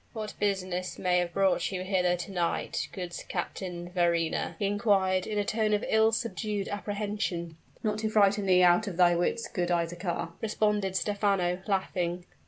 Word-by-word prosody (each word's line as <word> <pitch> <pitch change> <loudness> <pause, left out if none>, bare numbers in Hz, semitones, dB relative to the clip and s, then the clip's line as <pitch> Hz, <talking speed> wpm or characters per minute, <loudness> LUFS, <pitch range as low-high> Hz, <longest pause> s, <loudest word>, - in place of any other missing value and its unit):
"What 215 -2 -5
business 185 -3 -1
may 180 -1 +2
have 175 -1 -1
brought 195 +2 +1
you 185 -1 -3
hither 180 -2 +2
to 180 +3 -6
night, 175 -3 -1
good 180 -3 -6
Captain 175 -1 -4
Verrina?" 170 -2 0
he 200 - -1
inquired 195 -3 +2
in 215 - -2
a 205 - +1
tone 215 -1 +1
of 205 - -2
ill 220 0 +4
subdued 215 -3 -2
apprehension. 205 -5 -3 0.3
"Not 210 -1 0
to 220 0 -1
frighten 205 -1 +3
thee 180 -1 +5
out 180 +4 +5
of 180 -4 -5
thy 175 -1 +5
wits, 175 +7 0
good 180 -4 -2
Isaachar," 170 0 -1
responded 210 -3 0
Stephano, 195 -3 +1
laughing. 180 -3 -1
190 Hz, 165 wpm, -29 LUFS, 175-210 Hz, 0.3 s, thee